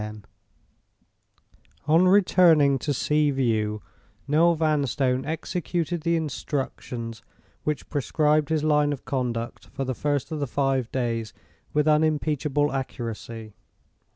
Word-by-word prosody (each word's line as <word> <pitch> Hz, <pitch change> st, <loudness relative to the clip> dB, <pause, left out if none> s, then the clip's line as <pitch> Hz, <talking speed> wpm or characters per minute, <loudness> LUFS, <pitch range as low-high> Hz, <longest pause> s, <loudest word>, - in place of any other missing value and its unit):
On 165 Hz, +4 st, +5 dB
returning 170 Hz, -7 st, +5 dB
to 145 Hz, -, -2 dB
Sea 150 Hz, +2 st, +1 dB
View, 110 Hz, -6 st, 0 dB, 0.4 s
Noel 165 Hz, +4 st, +4 dB
Vanstone 140 Hz, -4 st, +1 dB
executed 170 Hz, +1 st, -2 dB
the 170 Hz, +1 st, +1 dB
instructions 130 Hz, -6 st, -4 dB, 0.4 s
which 150 Hz, -2 st, -2 dB
prescribed 150 Hz, +1 st, +1 dB
his 155 Hz, -2 st, 0 dB
line 150 Hz, -1 st, +3 dB
of 135 Hz, -, -9 dB
conduct 120 Hz, -4 st, -3 dB
for 135 Hz, -, -4 dB
the 130 Hz, -, -2 dB
first 145 Hz, +2 st, -2 dB
of 155 Hz, -, -3 dB
the 140 Hz, -, -1 dB
five 135 Hz, -2 st, 0 dB
days 115 Hz, -3 st, -2 dB, 0.4 s
with 150 Hz, 0 st, +1 dB
unimpeachable 150 Hz, -1 st, +1 dB
accuracy. 115 Hz, -4 st, -5 dB
145 Hz, 110 wpm, -25 LUFS, 130-155 Hz, 0.4 s, On